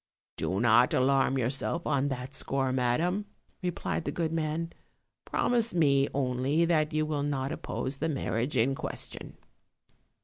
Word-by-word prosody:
"Do 95 Hz, -, -1 dB
not 120 Hz, +2 st, +5 dB
alarm 135 Hz, +1 st, +3 dB
yourself 135 Hz, +6 st, -1 dB
on 140 Hz, 0 st, +1 dB
that 130 Hz, 0 st, -4 dB
score, 135 Hz, -1 st, 0 dB
madam," 165 Hz, +11 st, +1 dB, 0.3 s
replied 180 Hz, -2 st, -2 dB
the -, -, -1 dB
good 165 Hz, -2 st, -2 dB
man; 165 Hz, +1 st, -2 dB, 0.5 s
"promise 235 Hz, -4 st, +1 dB
me 140 Hz, -4 st, +4 dB
only 135 Hz, +4 st, +1 dB
that 155 Hz, -3 st, +2 dB
you 155 Hz, 0 st, +1 dB
will 150 Hz, -2 st, -1 dB
not 140 Hz, -1 st, -1 dB
oppose 135 Hz, +1 st, -3 dB
the 160 Hz, +3 st, -1 dB
marriage 130 Hz, -2 st, -1 dB
in 125 Hz, +4 st, +3 dB
question." -, -, -6 dB
140 Hz, 140 wpm, -29 LUFS, 130-160 Hz, 0.5 s, not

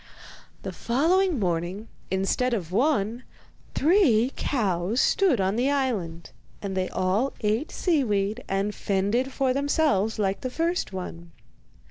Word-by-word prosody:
The -, -, -4 dB
following 335 Hz, +8 st, +1 dB
morning, 180 Hz, +2 st, -2 dB, 0.2 s
instead 195 Hz, +6 st, 0 dB
of 175 Hz, -6 st, -5 dB
one, 235 Hz, 0 st, +1 dB, 0.5 s
three 275 Hz, -, +3 dB
cows 205 Hz, -3 st, 0 dB
stood 360 Hz, -, +3 dB
on 190 Hz, +3 st, +1 dB
the 255 Hz, +3 st, +2 dB
island, 215 Hz, -13 st, -2 dB, 0.3 s
and 195 Hz, -2 st, -4 dB
they 185 Hz, -1 st, -1 dB
all 190 Hz, +8 st, 0 dB
ate 220 Hz, +7 st, 0 dB
seaweed 220 Hz, -, 0 dB
and 195 Hz, +2 st, 0 dB
fended 205 Hz, +8 st, 0 dB
for 265 Hz, -1 st, +1 dB
themselves 275 Hz, -, +1 dB
like 195 Hz, -2 st, -1 dB
the 255 Hz, -, -3 dB
first 335 Hz, -, -1 dB
one. 170 Hz, -3 st, -7 dB
220 Hz, 125 wpm, -26 LUFS, 190-270 Hz, 0.5 s, three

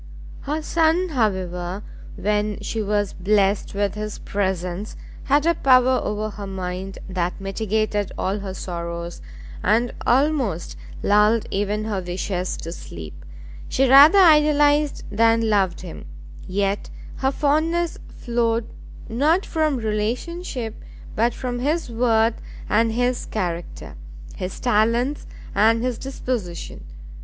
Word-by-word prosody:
Her 305 Hz, +2 st, -3 dB
son, 330 Hz, +3 st, +2 dB
however, 190 Hz, -, -1 dB, 0.3 s
when 210 Hz, 0 st, -1 dB
she 220 Hz, +2 st, -3 dB
was 205 Hz, -1 st, 0 dB
blessed 200 Hz, +1 st, +1 dB
with 200 Hz, -1 st, 0 dB
his 210 Hz, 0 st, -5 dB
presence, 190 Hz, 0 st, -3 dB, 0.3 s
had 290 Hz, +2 st, +3 dB
a 335 Hz, -, +4 dB
power 255 Hz, -3 st, +4 dB
over 210 Hz, +1 st, -2 dB
her 205 Hz, 0 st, -7 dB
mind 190 Hz, 0 st, -5 dB
that 180 Hz, -1 st, -2 dB
mitigated 205 Hz, +1 st, -1 dB
all 195 Hz, +2 st, -1 dB
her 195 Hz, -1 st, -6 dB
sorrows, 170 Hz, -1 st, -5 dB, 0.4 s
and 230 Hz, +4 st, +2 dB
almost 260 Hz, -, +1 dB, 0.3 s
lulled 210 Hz, +2 st, +4 dB
even 205 Hz, +2 st, -1 dB
her 205 Hz, -3 st, -2 dB
wishes 180 Hz, +1 st, -3 dB
to 165 Hz, -, -7 dB
sleep; 80 Hz, -, -9 dB, 0.6 s
she 270 Hz, +1 st, +2 dB
rather 280 Hz, +8 st, +8 dB
idolised 300 Hz, -4 st, +5 dB
than 225 Hz, +1 st, +3 dB
loved 190 Hz, -4 st, +1 dB
him, 180 Hz, -3 st, -9 dB, 0.4 s
yet 195 Hz, +1 st, -1 dB, 0.3 s
her 265 Hz, 0 st, +1 dB
fondness 315 Hz, +4 st, +1 dB
flowed 235 Hz, -1 st, -1 dB, 0.4 s
not 305 Hz, -, +2 dB
from 310 Hz, -4 st, 0 dB
relationship, 230 Hz, +4 st, -3 dB, 0.4 s
but 235 Hz, +2 st, +2 dB
from 245 Hz, -1 st, -3 dB
his 295 Hz, +1 st, -1 dB
worth 230 Hz, -1 st, +2 dB, 0.3 s
and 225 Hz, +1 st, +2 dB
his 245 Hz, +1 st, 0 dB
character, 175 Hz, -5 st, -4 dB, 0.4 s
his 185 Hz, -1 st, -5 dB
talents 240 Hz, +4 st, +1 dB, 0.3 s
and 225 Hz, +2 st, +3 dB
his 250 Hz, -2 st, -2 dB
disposition. 235 Hz, -, -5 dB
215 Hz, 120 wpm, -22 LUFS, 195-260 Hz, 0.6 s, rather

